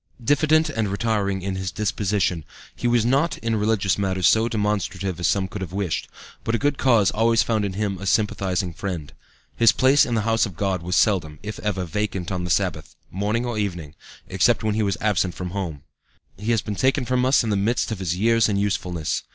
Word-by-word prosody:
"Diffident 155 +5 +3
and 110 -2 -1
retiring 100 -2 -1
in 95 0 -2
his 95 -1 -3
disposition, 100 -5 -1 0.3
he 120 - -2
was 120 -2 +2
not 140 +7 +1
in 115 0 -1
religious 105 -2 +1
matters 95 -3 +1
so 110 +4 +3
demonstrative 100 -4 -2
as 90 - +1
some 95 +1 +1
could 100 - -7
have 90 -2 -6
wished, 95 -5 -2 0.4
but 115 - 0
a - - +2
good 145 +2 0
cause 115 -7 +4
always 115 +1 +3
found 110 -3 0
in 100 - -3
him 100 -1 -2
a 100 - -5
sympathizing 95 -4 0
friend. 85 -4 -5 0.4
His 115 -2 +5
place 135 +2 +4
in 120 - -1
the 110 - +1
house 115 +1 +1
of 90 -6 -11
God 95 -2 -1
was 90 +1 -2
seldom, 85 -8 +2
if 105 0 -6
ever, 95 -3 -2
vacant 95 0 -3
on 90 -2 -2
the - - -5
Sabbath, - - -1 0.2
morning 105 +5 -1
or 120 -3 -2
evening, 85 -7 -4 0.3
except - - +2
when 110 -1 +1
he 110 - 0
was 100 -3 0
absent 95 -4 +1
from 90 -1 -5
home. 85 -7 -5 0.5
"He 105 +3 -5
has 115 -3 +2
been 105 - -4
taken 130 +5 +1
from 125 0 +1
us 130 0 +4
in 110 - -1
the - - +2
midst 110 +4 0
of 110 - -3
his 90 -3 -1
years 115 +3 +3
and 100 -1 0
usefulness. 90 -5 -1
105 Hz, 215 wpm, -23 LUFS, 95-115 Hz, 0.5 s, His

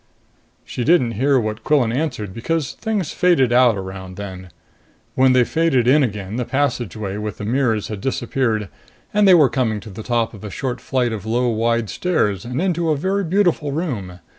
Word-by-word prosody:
She 125 - -4
didn't 145 -5 +3
hear 130 +5 +2
what 110 -1 -4
Quillan 135 -7 +2
answered, 120 -9 -3
because 150 - -2
things 215 -7 -2
faded 150 -9 +3
out 120 -3 +5
around 95 -1 -7
then. 95 -2 -8 0.6
When 130 0 +4
they 125 -1 +5
faded 140 -4 +1
in 145 +4 +5
again, 105 -4 -3
the 125 - 0
passageway 120 -7 -2
with 105 -1 -5
the 105 - -6
mirrors 115 -3 0
had 105 -3 -5
disappeared, 120 -4 -1 0.5
and 210 -1 +4
they 185 - +8
were 155 -5 +6
coming 120 -5 -1
to 105 - -10
the 105 +4 -8
top 115 0 -1
of 105 - -12
a 105 - -5
short 125 +5 -4
flight 125 -3 0
of 110 0 -6
low, 120 +2 +1
wide 115 0 0
stairs 105 - 0
and 125 +2 -3
into 170 -2 0
a 155 - +2
very 195 +6 0
beautiful 175 -5 +1
room. 105 - -4
120 Hz, 190 wpm, -20 LUFS, 105-145 Hz, 0.6 s, they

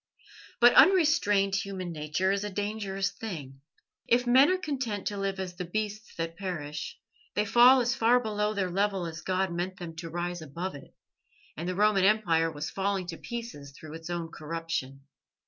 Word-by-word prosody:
But 240 0 +7
unrestrained 295 - +5
human 190 -3 -4
nature 155 +4 -1
is 200 0 -1
a 210 - -3
dangerous 200 -1 -2
thing. 160 -11 -7 0.5
If 245 +1 +3
men 260 +5 +6
are 370 - +2
content 260 - -3
to 205 - -2
live 195 -1 -2
as 185 -1 -4
the 180 - -3
beasts 215 +4 -4
that 165 0 -4
perish, 160 -6 -5 0.4
they 210 - +1
fall 245 +4 +7
as 240 +1 +1
far 240 0 +4
below 210 -2 -1
their 190 -2 -1
level 195 -1 0
as 165 0 -6
God 185 -1 -1
meant 180 +2 -3
them 165 -2 -8
to 165 0 -6
rise 175 +1 -3
above 170 +5 -5
it, 140 -1 -13 0.6
and 170 +3 -4
the 185 - -2
Roman 205 -1 +3
Empire 170 -6 +3
was 155 +1 -5
falling 195 -1 -1
to 165 - -5
pieces 230 -13 -7
through 155 -1 -10
its 165 +1 -8
own 170 -1 -3
corruption. 155 -4 -4
190 Hz, 180 wpm, -28 LUFS, 165-210 Hz, 0.6 s, But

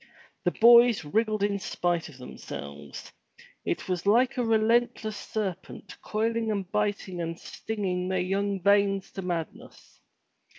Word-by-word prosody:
The - - +5
boys 235 -5 +7
wriggled 215 +5 0
in 200 -1 0
spite 175 -3 -1
of 140 - -14
themselves. 70 - -9 0.5
It - - -3
was 180 0 -2
like 240 +5 +4
a 250 - 0
relentless 225 -1 +1
serpent 195 -4 -5
coiling 225 +1 -1
and 200 -3 -2
biting 205 -4 -1
and 165 0 -4
stinging 185 -5 -3
their 190 0 0
young 195 +1 -1
veins 200 -1 +2
to 195 - -6
madness. 175 -3 -6
200 Hz, 130 wpm, -27 LUFS, 180-220 Hz, 0.5 s, boys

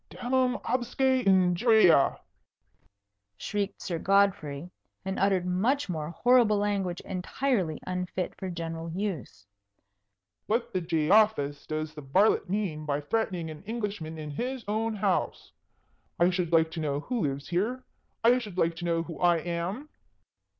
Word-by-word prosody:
"Damnum 255 0 0
absque 260 +1 +1
injuria!" 185 - +5 1.2
shrieked 205 -1 -3
Sir 170 -4 -3
Godfrey, 180 -6 +1 0.3
and 190 0 -3
uttered 195 -2 +2
much 220 +9 0
more 155 -3 -3
horrible 235 +3 +4
language 200 -4 -1
entirely 185 - -1
unfit 180 0 -3
for 190 - -5
general 165 -1 -5
use. 165 - -4 1.0
"What 230 +3 -1
the 185 - 0
Jeofailes 165 -2 +2
does 155 0 -3
the 150 - -8
varlet 180 +9 +2
mean 185 -6 -2
by 145 -1 -1
threatening 175 0 -2
an 150 - -10
Englishman 205 -8 -4
in 150 -1 -6
his 250 - -4
own 220 +1 -1
house? 195 -2 -1 0.7
I 175 +2 +4
should 175 -2 -1
like 160 -1 +3
to 165 - -5
know 145 -2 -1
who 245 +7 -3
lives 140 -2 -3
here? 220 +9 -1 0.4
I 245 +2 +5
should 210 -7 -8
like 165 -2 +1
to 175 - -5
know 165 -1 +1
who 165 -1 -9
I 175 -1 +4
am?" 175 - -4
180 Hz, 140 wpm, -28 LUFS, 165-215 Hz, 1.2 s, injuria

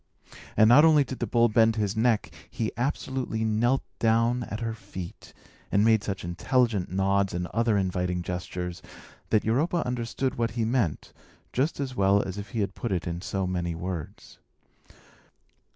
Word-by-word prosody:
And 110 - +7
not 125 +6 +8
only 155 -3 +6
did 130 -1 -7
the 120 - -1
bull 120 +3 +4
bend 110 0 +3
his 105 -2 -1
neck, 110 -1 +1 0.2
he 110 -2 -2
absolutely 125 -2 -2
knelt 120 +5 +1 0.2
down 115 +2 +2
at 105 - -5
her 115 -1 -2
feet, 95 -5 -9 0.4
and 100 +2 +3
made 110 -2 +4
such 100 -2 -4
intelligent 105 +3 +1
nods, 95 0 +1
and 90 0 -2
other 115 -2 +2
inviting 90 -2 -1
gestures, 90 0 -5 0.5
that 110 - +2
Europa 155 +10 +1
understood 125 +1 -2
what 115 -1 +1
he 115 - +1
meant 115 - -1 0.4
just 140 +5 0
as 135 -2 -3
well 100 0 +3
as 95 +1 -5
if 100 0 -7
he 110 +1 -2
had 100 -1 -2
put 120 - -4
it 90 -3 -1
in 85 0 -4
so 95 0 -2
many 90 -2 -2
words. 85 -2 -7
110 Hz, 170 wpm, -27 LUFS, 95-120 Hz, 0.5 s, not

